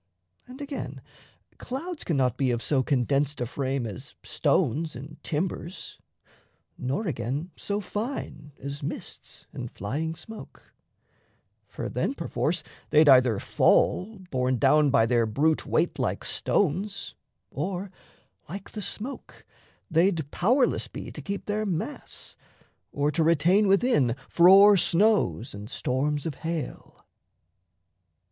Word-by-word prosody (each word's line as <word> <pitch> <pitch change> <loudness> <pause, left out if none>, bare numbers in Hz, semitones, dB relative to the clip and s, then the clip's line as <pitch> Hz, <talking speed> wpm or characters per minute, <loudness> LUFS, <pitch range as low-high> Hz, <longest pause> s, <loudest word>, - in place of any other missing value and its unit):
And, 255 +3 -10
again, 280 -1 -5 0.6
Clouds 320 +6 -5
cannot 130 -7 +1
be 135 -1 +1
of 120 -1 -1
so 140 -3 +2
condensed 140 +2 +1
a 120 - 0
frame 130 +1 -2
As 105 -5 -8
stones 155 +5 +1
and 145 +5 -10
timbers, 170 +2 -4 0.8
nor 135 - -2
again 150 - -3
so 205 0 -2
fine 205 - -5
As 140 +2 -6
mists 140 - -7
and - - -5
flying 155 +10 -3
smoke; 220 +6 -12 0.9
for - - -5
then 275 - -1
perforce 165 - -1 0.3
They'd 150 0 +5
either 125 -6 +6
fall, 210 +4 +2
borne 130 -1 +1
down 145 +3 +4
by 135 -4 +4
their 115 -1 +2
brute 150 +8 +1
weight, - - +1
Like - - -1
stones, 200 +3 0 0.4
or, 190 0 -3 0.6
like 195 +4 -7
the 215 - -6
smoke, 235 +7 -6 0.5
they'd 165 -3 +2
powerless 245 +8 +2
be - - -8
To - - -7
keep 200 0 -5
their 210 +1 -1
mass, 185 -6 -4 0.6
or 145 +1 0
to 160 +3 0
retain 170 +6 +4
within 195 - +3
Frore 195 +4 +7
snows 190 - +2
and 100 +2 -8
storms 140 +3 -1
of 160 - -2
hail. 160 -4 -5
155 Hz, 125 wpm, -27 LUFS, 135-195 Hz, 0.9 s, Frore